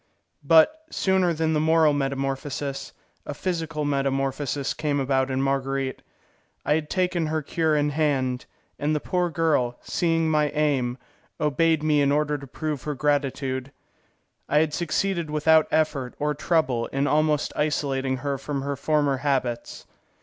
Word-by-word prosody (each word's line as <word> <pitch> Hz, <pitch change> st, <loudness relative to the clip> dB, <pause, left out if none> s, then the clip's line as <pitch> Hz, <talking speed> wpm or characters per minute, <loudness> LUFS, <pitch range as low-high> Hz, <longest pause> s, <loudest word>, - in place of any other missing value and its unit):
But, 165 Hz, -, +5 dB
sooner 190 Hz, -2 st, +2 dB
than 160 Hz, -1 st, 0 dB
the 155 Hz, -, +2 dB
moral 160 Hz, -1 st, +4 dB
metamorphosis, 135 Hz, 0 st, -3 dB, 0.3 s
a -, -, -6 dB
physical 165 Hz, -4 st, -2 dB
metamorphosis 135 Hz, 0 st, -1 dB
came 145 Hz, -2 st, -1 dB
about 135 Hz, 0 st, +1 dB
in 130 Hz, 0 st, 0 dB
Marguerite. 135 Hz, -1 st, -1 dB, 0.6 s
I 150 Hz, -, +3 dB
had 155 Hz, -1 st, -1 dB
taken 180 Hz, -3 st, 0 dB
her 155 Hz, 0 st, -1 dB
cure 160 Hz, +1 st, 0 dB
in 145 Hz, 0 st, +1 dB
hand, 135 Hz, -4 st, 0 dB, 0.3 s
and 150 Hz, +2 st, 0 dB
the -, -, +1 dB
poor 180 Hz, +3 st, -1 dB
girl, 155 Hz, -8 st, +1 dB
seeing 165 Hz, -2 st, +1 dB
my 150 Hz, -1 st, +2 dB
aim, 135 Hz, -5 st, +1 dB, 0.4 s
obeyed 155 Hz, +1 st, +2 dB
me 150 Hz, -2 st, +3 dB
in 140 Hz, 0 st, +3 dB
order 150 Hz, 0 st, +1 dB
to 140 Hz, -, -10 dB
prove 150 Hz, +1 st, -4 dB
her 150 Hz, -1 st, -4 dB
gratitude. 135 Hz, -2 st, -1 dB, 0.8 s
I 150 Hz, -, +3 dB
had 155 Hz, 0 st, +2 dB
succeeded 170 Hz, 0 st, -1 dB
without 155 Hz, +1 st, +4 dB
effort 140 Hz, -5 st, 0 dB
or 150 Hz, 0 st, 0 dB
trouble 140 Hz, -6 st, 0 dB
in 135 Hz, +1 st, -1 dB
almost 150 Hz, 0 st, +1 dB
isolating 135 Hz, -3 st, 0 dB
her 140 Hz, -1 st, -1 dB
from 140 Hz, 0 st, -4 dB
her 140 Hz, 0 st, -2 dB
former 145 Hz, -1 st, +1 dB
habits. 130 Hz, -4 st, -2 dB
150 Hz, 150 wpm, -25 LUFS, 135-155 Hz, 0.8 s, But